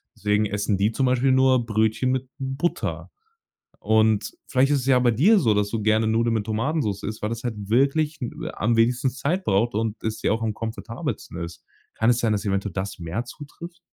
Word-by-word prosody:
Deswegen 105 +1 +1
essen 105 0 -1
die 100 +3 +2
zum 130 +3 0
Beispiel 130 +1 +2
nur 130 -2 +4
Brötchen 110 +3 +1
mit 130 0 -2
Butter 135 +5 -3 0.7
und 110 -1 +2 0.2
vielleicht 130 +2 +2
ist 140 - +3
es 125 - -5
ja 130 -2 +5
bei 120 -1 +3
dir 185 - +5
so, 115 - +3
dass 105 0 +1
du 110 -1 -2
gerne 110 +1 +2
Nudeln 115 +1 +2
mit 110 -2 -1
Tomatensoße 110 -2 -1
isst, 110 0 -5
weil 105 - -1
das 115 +1 -5
halt 120 -3 -2
wirklich, 140 +5 +2
äh, 120 - -5
am 115 +2 0
wenigsten 120 +3 +2
Zeit 155 +8 -2
braucht 105 +4 +1
und 110 0 -2
es 110 0 -3
ja - - +2
auch 115 - 0
am 110 -1 -1
komfortabelsten 110 -5 -5
ist. 85 0 -9 0.3
Kann 110 +2 +1
es 120 0 +3
sein, 115 -2 +1
dass 105 0 -1
eventuell 100 -1 -1
das 95 +1 -4
mehr 85 +8 -4
zutrifft? 165 +7 -10
115 Hz, 205 wpm, -24 LUFS, 105-130 Hz, 0.7 s, ja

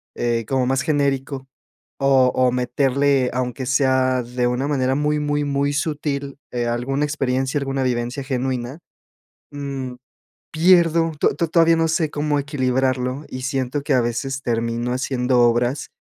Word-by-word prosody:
eh, 115 -1 -1
como 130 -2 +1
más 135 0 +1
genérico 140 -3 -1 0.5
o 135 -2 +4
o 130 -1 +3
meterle, 130 +2 +1
aunque 125 0 -3
sea 130 -1 +2
de 125 +1 -1
una 125 +3 -1
manera 135 -2 +1
muy, 150 +1 0
muy, 145 0 0
muy 140 0 0
sutil, 145 -2 -3
eh, 120 -1 -2
alguna 125 +5 -1
experiencia, 135 -2 -1
alguna 135 -1 -2
vivencia 125 +2 -2
genuina, 130 +1 -3 0.7
mm, 140 -3 -5 0.6
pierdo, 165 -1 +4
to - - +2
to 165 +2 -1
todavía 165 0 +4
no 165 0 +1
sé 160 -1 0
cómo 150 0 0
equilibrarlo 130 -1 -1
y 130 - -6
siento 135 +1 -2
que 145 - -1
a 125 - +4
veces 125 +3 -2
termino 115 0 -1
haciendo 125 -1 +1
obras, 120 +3 +1
135 Hz, 145 wpm, -21 LUFS, 125-145 Hz, 0.7 s, o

